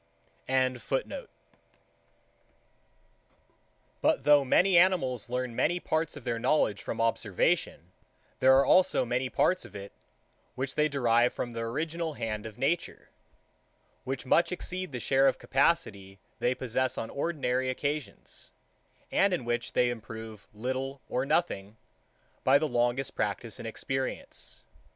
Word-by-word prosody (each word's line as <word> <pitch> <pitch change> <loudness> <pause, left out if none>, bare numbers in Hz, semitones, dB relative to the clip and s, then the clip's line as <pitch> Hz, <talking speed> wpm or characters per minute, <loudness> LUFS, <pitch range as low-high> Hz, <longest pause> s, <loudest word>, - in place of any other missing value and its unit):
85. 130 - -1 2.7
But 310 -3 +2
though 145 -1 +6
animals 170 - +3
learn 125 -1 -2
many 175 +7 +1
parts 160 -3 -1
of 145 - -10
their 115 -1 -2
knowledge 110 -7 +1
from 115 - -5
observation, 115 - 0 0.5
there 130 0 +6
are 135 - +4
also 180 -3 +4
many 125 +2 -1
parts 185 +7 +2
of - - -13
it, 100 0 -8 0.6
which 130 +1 -3
they 150 0 +2
derive 120 -3 +2
from 120 - -3
the 115 - -5
original 155 +8 -3
hand 110 -2 -4
of 110 - -11
nature; 165 +6 -2 0.9
which 135 0 -4
much 170 +6 +3
exceed 185 -1 -4
the 125 - -4
share 135 +3 +3
of - - +2
capacity 110 - 0 0.2
they 125 +1 +1
possess 130 +1 -1
on 115 - -4
ordinary 130 -5 -1
occasions; 145 +3 -4 0.6
and 195 -1 +3
in 130 - -6
which 120 0 -2
they 125 -1 +3
improve, 110 -2 -8
little 130 +5 -4
or 130 +2 -1
nothing, 105 - 0 0.7
by 135 +2 +6
the 155 - 0
longest 120 +1 0
practice 105 +2 -2
and - - -6
experience. 130 +4 -4
130 Hz, 130 wpm, -29 LUFS, 115-150 Hz, 2.7 s, though